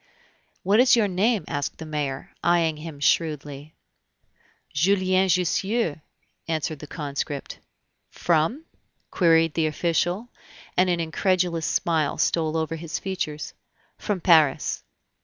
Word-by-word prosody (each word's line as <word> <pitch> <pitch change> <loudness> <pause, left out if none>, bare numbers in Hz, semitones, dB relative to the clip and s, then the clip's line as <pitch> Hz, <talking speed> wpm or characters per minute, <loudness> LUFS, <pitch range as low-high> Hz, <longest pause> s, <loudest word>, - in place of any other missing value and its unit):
"What 200 +4 +3
is 250 0 +6
your 225 -3 +3
name?" 200 0 +1
asked 145 -1 -3
the 160 - -8
mayor, 145 -3 -4
eying 170 -3 +2
him 155 -2 -8
shrewdly. 150 0 -1 1.0
"Julien 185 +3 +2
Jussieu," 180 0 0 0.5
answered 155 -2 -2
the 150 - -9
conscript. 145 -2 -5 0.5
"From 170 - 0 0.2
?" - - -47
queried 165 -3 +3
the 160 -1 +1
official, 175 +7 -1 0.5
and 185 0 +3
an 175 -1 +1
incredulous 170 0 0
smile 160 -4 0
stole 160 -1 +1
over 160 0 -2
his 165 0 -4
features. 170 -6 -4 0.5
"From 205 -3 -2
Paris." 160 -6 +3
165 Hz, 120 wpm, -24 LUFS, 155-185 Hz, 1.0 s, is